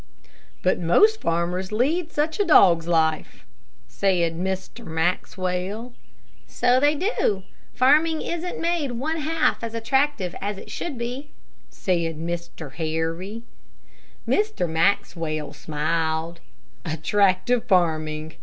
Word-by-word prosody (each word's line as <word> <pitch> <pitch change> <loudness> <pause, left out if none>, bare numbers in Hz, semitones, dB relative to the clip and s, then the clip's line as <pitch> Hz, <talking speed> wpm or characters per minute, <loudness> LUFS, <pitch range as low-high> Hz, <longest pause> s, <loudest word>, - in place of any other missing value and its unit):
"But 185 - +2
most 425 - +4
farmers 175 +3 -1
lead 310 +10 0
such 310 +6 -1
a - - +4
dog's 175 - +5
life," 160 -2 0 0.4
said 170 - +1
Mr. 190 +6 -4
Maxwell. 185 +6 -2 0.5
"So 250 +1 +2
they 290 +2 +3
do; 285 - 0 0.3
farming 310 +5 +4
isn't 345 +1 -4
made 330 -6 0
one 300 +7 -2
half 320 -4 0
as 230 0 -4
attractive 235 -4 0
as 205 0 -3
it - - -10
should 305 -7 -4
be," 250 +5 -5 0.4
said 170 -4 -1
Mr. 170 -3 -6
Harry. 165 +8 -3 0.8
Mr. 420 - +1
Maxwell 160 -3 0
smiled. 160 +2 -2 0.4
"Attractive 200 - +1
farming. 155 -5 +1
190 Hz, 105 wpm, -24 LUFS, 165-265 Hz, 0.8 s, dog's